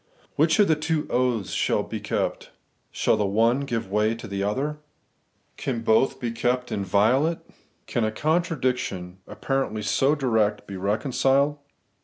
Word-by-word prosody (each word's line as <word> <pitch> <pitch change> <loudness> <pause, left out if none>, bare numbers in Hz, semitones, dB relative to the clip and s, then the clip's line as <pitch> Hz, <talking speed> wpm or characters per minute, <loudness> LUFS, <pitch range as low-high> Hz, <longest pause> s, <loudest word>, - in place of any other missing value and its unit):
Which 160 +5 +3
of 205 -2 +5
the 160 - +4
two 155 0 -1
oaths 125 -5 0
shall - - +1
be - - -5
kept? - - -2 0.4
Shall - - +1
the 105 - +1
one 115 +6 +2
give 115 -8 -3
way 105 +2 +2
to 115 0 -9
the 100 -1 -3
other? 135 +9 -1 0.8
Can 125 -4 -3
both 130 +4 +2
be 120 -3 -2
kept 125 +2 -1
inviolate? 110 - +2 0.5
Can 120 - -1
a 110 - 0
contradiction, 125 - -1
ap - - -12
parently 135 -6 -1
so 135 +8 +2
direct, 110 -7 +1
be 100 - -8
reconciled? 130 +8 +1
120 Hz, 150 wpm, -25 LUFS, 105-140 Hz, 0.8 s, of